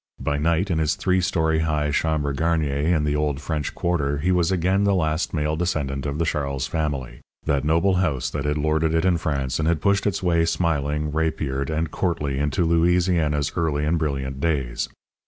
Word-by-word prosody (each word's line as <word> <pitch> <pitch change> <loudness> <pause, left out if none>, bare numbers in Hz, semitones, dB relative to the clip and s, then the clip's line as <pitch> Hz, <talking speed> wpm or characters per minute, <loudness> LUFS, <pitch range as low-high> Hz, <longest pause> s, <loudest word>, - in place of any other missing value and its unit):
By 70 0 -1
night, 85 +5 +1
in 80 - +1
his 75 -1 +1
three 95 -1 +1
story 80 -3 +1
high 75 -2 0
chambre 75 -1 0
garnier 80 -1 0 0.2
in 75 - +1
the 75 0 0
old 75 -2 0
French 75 -1 -3
Quarter 75 -5 0
he 85 +6 0
was 90 -1 +2
again 95 +2 +2
the 100 -1 +3
last 80 -2 0
male 75 -1 -1
descendant 75 -5 -2
of 70 +1 -3
the 85 - 0
Charles 70 -4 -1
family, 70 -7 -3 0.2
that 70 -3 +1
noble 85 +5 +2
house 80 -9 0
that 75 - -3
had 75 +1 0
lorded 80 +2 +1
it 80 - +2
in 90 -2 +3
France, 70 -5 -1
and 80 - 0
had 85 -2 +2
pushed 100 +4 +2
its 100 - -1
way 85 -2 +3
smiling, 75 -3 0
rapiered, 75 -3 -1
and 80 0 -1
courtly 75 -7 -1
into 75 +4 +1
Louisiana's 85 -3 +2
early 75 -4 0
and 80 +2 +1
brilliant 70 -3 -2
days. 70 -6 -1
80 Hz, 190 wpm, -23 LUFS, 75-85 Hz, 0.2 s, the